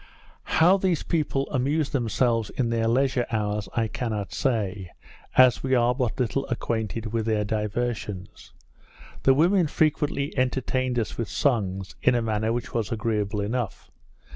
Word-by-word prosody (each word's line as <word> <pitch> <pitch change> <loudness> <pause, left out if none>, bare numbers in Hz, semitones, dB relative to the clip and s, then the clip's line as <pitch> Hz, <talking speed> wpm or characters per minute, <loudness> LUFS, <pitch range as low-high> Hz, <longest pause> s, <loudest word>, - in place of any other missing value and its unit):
How 180 +4 +6
these 185 -5 0
people 145 -4 0
amuse 145 +3 0
themselves 115 -2 +1
in 120 -3 -1
their 115 -1 +1
leisure 130 +1 +1
hours, 105 -2 -2
I 115 -1 +1
cannot 110 -3 -3
say, 100 - -1 0.5
as 130 -1 +6
we 130 0 +1
are 120 0 +3
but 125 -2 -2
little 130 +3 0
acquainted 115 -2 -3
with 115 -1 -1
their 110 -1 +1
diversions. 105 -2 -3 0.7
The 135 - +5
women 175 +3 +4
frequently 150 -2 0
entertained 130 -1 0
us 115 0 -2
with 115 - -2
songs, 100 -8 -1
in 125 - +4
a 120 - +2
manner 110 0 0
which 120 0 -3
was 115 -3 -1
agreeable 105 -2 -1
enough. 115 0 -3
120 Hz, 145 wpm, -25 LUFS, 110-130 Hz, 0.7 s, How